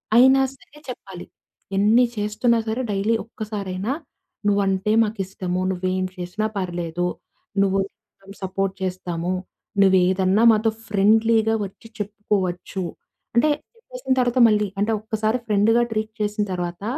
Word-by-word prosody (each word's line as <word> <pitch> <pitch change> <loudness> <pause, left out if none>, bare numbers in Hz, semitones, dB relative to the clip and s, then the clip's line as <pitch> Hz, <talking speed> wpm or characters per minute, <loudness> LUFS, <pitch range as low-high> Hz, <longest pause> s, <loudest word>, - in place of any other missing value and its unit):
అయినా 265 +2 +7
సరే 295 +2 -19
చెప్పాలి. 190 -7 -8 0.5
ఎన్ని 220 +5 +5
చేస్తున్నా 210 +3 +1
సరే, 225 +4 -1
డైలీ 205 +3 +1
ఒక్కసారైనా 210 -2 -4 0.6
నువ్వు 200 0 +3
అంటే 190 +2 +1
మాకిష్టము. 190 -4 -3
నువ్వు 185 0 -4
ఏం 185 - 0
చేసినా 180 +4 -3
పర్లేదు. 175 -2 -2 0.5
నువ్వు 195 0 +2 0.6
సపోర్ట్ 190 0 -2
చేస్తాము. 180 -1 -2 0.5
నువ్వు 190 -1 +6
ఏదన్నా 190 +3 +2
మాతో 220 +1 +3 0.2
ఫ్రెండ్లీగా 220 +2 +3
వచ్చి 195 +4 -12
చెప్పుకోవచ్చు. 195 -3 -2 0.5
అంటే 240 +6 +4 0.3
చెప్పేసిన - - -3
తర్వాత 245 0 +2
మళ్ళీ 210 -1 +2
అంటె 210 +2 +1
ఒక్కసారి 220 +1 0
ఫ్రెండ్‌గా 215 +3 +4
ట్రీట్ 215 0 -2
చేసిన 210 0 0
తర్వాత 175 +1 -4
205 Hz, 120 wpm, -23 LUFS, 185-225 Hz, 0.6 s, అయినా